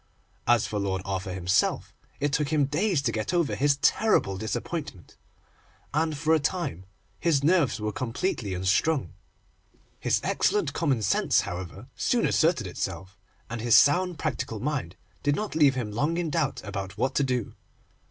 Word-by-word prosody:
As 120 -2 +4
for 105 - -3
Lord 95 -1 -2
Arthur 95 0 -3
himself, 90 +2 0 0.3
it 145 0 0
took 150 -2 +1
him 150 -2 +2
days 155 +2 0
to 120 - +1
get 110 +10 -2
over 170 -4 +1
his 140 0 +2
terrible 210 - +3
disappointment, 110 - -5 0.8
and 155 0 0
for 160 +2 +2
a 160 - +4
time 145 - -3 0.3
his 150 -5 +2
nerves 160 -6 +3
were 105 0 -2
completely 115 - -2
unstrung. 100 - +1 0.9
His - - +1
excellent 415 -1 +1
common 135 -9 0
sense, - - +3
however, 95 +6 -7
soon 240 -2 +1
asserted 160 - +2
itself, 95 +1 -5 0.3
and 115 -1 -5
his 120 0 +6
sound, 180 +4 +4
practical 120 -7 -3
mind 130 - -3 0.3
did 145 +1 +1
not 215 +5 -3
leave 145 -4 +4
him 115 -5 -3
long 150 +10 0
in 170 -3 -1
doubt 140 0 -1
about 100 -2 -6
what 130 - 0
to 145 - +2
do. 125 -4 -1
135 Hz, 160 wpm, -27 LUFS, 100-155 Hz, 0.9 s, his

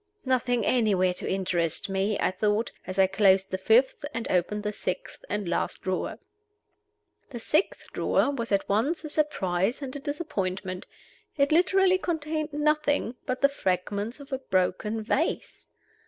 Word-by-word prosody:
"Nothing 245 -3 +1
anywhere 200 -7 +3
to - - -5
interest 175 -4 0
me," 195 +2 0
I - - +2
thought, 210 +4 0 0.2
as 185 0 -5
I 190 - +6
closed 195 0 +3
the 190 - -2
fifth, 235 +9 +3
and 230 - -3
opened 195 +4 0
the 210 0 -2
sixth - - -5
and 205 -3 -2
last 170 - -2
drawer. 185 -1 -2 1.1
The 245 -4 -6
sixth 305 - 0
drawer 280 - +2
was 235 -5 -4
at 200 -1 +1
once 265 +12 +1
a 305 - -5
surprise 200 - 0
and 275 -2 -6
a - - -4
disappointment. 190 - -3 0.5
It 280 0 +3
literally 370 +3 +4
contained 310 -3 -2
nothing 295 -4 +1
but 255 0 -2
the 280 - +6
fragments 205 0 -2
of 280 -1 -9
a 265 - -1
broken 210 0 0
vase. 275 +8 -2
225 Hz, 155 wpm, -27 LUFS, 190-285 Hz, 1.1 s, I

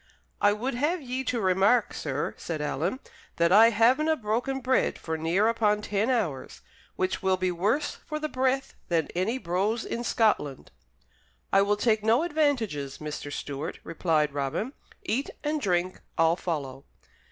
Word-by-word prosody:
"I 205 - +5
would 240 +6 -2
have 300 +9 0
ye 260 -2 -4
to 245 - -1
remark, 195 +4 +3
sir," 145 -1 -3
said 165 -2 -5
Alan, 160 - -2 0.4
"that 170 0 +2
I 220 +4 +8
havenae 260 +8 +3
broken 240 +5 -1
bread 260 0 +1
for 160 - -4
near 170 +7 +1
upon 210 -2 +2
ten 210 +4 0
hours, 195 - -2 0.3
which 185 0 -1
will 190 -1 +2
be 185 0 0
worse 210 - 0
for 305 - -3
the 305 0 -2
breath 265 -1 0
than 165 -3 0
any 190 +8 0
brose 205 +3 -1
in 235 - -3
Scotland." 210 - 0 0.8
"I 195 - +6
will 205 +1 +2
take 215 -1 +2
no 230 +7 +3
advantages, 245 - 0
Mr. 150 -1 -6
Stewart," 145 +2 -5
replied 155 -3 0
Robin. 145 - -2 0.3
"Eat 270 +5 -1
and 300 0 -1
drink; 180 -3 0 0.2
I'll 165 0 +4
follow." 140 -7 -4
210 Hz, 155 wpm, -27 LUFS, 170-250 Hz, 0.8 s, I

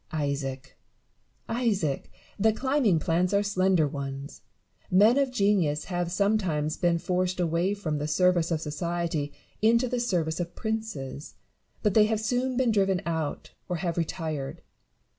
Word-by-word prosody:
Isaac! 140 -3 -3 0.7
Isaac! 205 - -1 0.3
the 220 +2 +4
climbing 260 - +2
plants 175 +4 +1
are 200 - +3
slender 185 -5 +2
ones. 140 0 -6 0.5
Men 215 +8 +5
of 275 -1 +2
genius 200 -10 +1
have 175 -2 -2
sometimes 185 -6 +1
been 175 -1 +2
forced 180 +1 -1
away 175 +3 +1
from 155 -7 -3
the 150 - -2
service 175 +1 +3
of 160 -3 -1
society 160 -1 -2 0.3
into 235 +3 +4
the 250 0 -1
service 175 -9 0
of 175 -1 -4
princes; 220 - -4 0.5
but 210 -3 +2
they 215 0 +6
have 220 0 0
soon 245 +3 0
been 255 -3 +3
driven 195 -3 +2
out, 160 -3 -3 0.2
or 180 - 0
have 170 -1 -2
retired. 160 -4 -3
180 Hz, 140 wpm, -27 LUFS, 155-210 Hz, 0.7 s, they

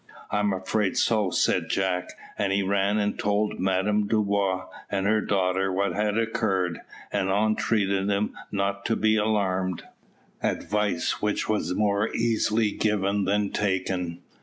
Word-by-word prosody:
"I 105 - +1
am 105 0 +2
afraid 95 +1 -1
so," 105 -4 +2
said - - +1
Jack, 95 -2 -1 0.2
and 100 -1 0
he 100 0 +2
ran 100 +2 +1
and 105 -1 -1
told 105 +1 0
Madame 95 +3 +1
Dubois 100 -3 +1 0.2
and 95 -1 -1
her 110 +1 +3
daughter 95 -1 +1
what 100 +2 0
had 105 0 0
occurred, 110 -6 0 0.3
and 100 -2 0
entreated 100 -1 +1
them 100 +1 0 0.2
not 100 0 -1
to 115 - +1
be 110 0 +2
alarmed 95 -4 0 0.6
advice 105 -4 -1
which 105 0 0
was 105 -4 0
more 105 0 +1
easily 115 -1 +1
given 100 -2 0
than 100 +1 +1
taken. 90 -3 -2
100 Hz, 140 wpm, -26 LUFS, 95-105 Hz, 0.6 s, her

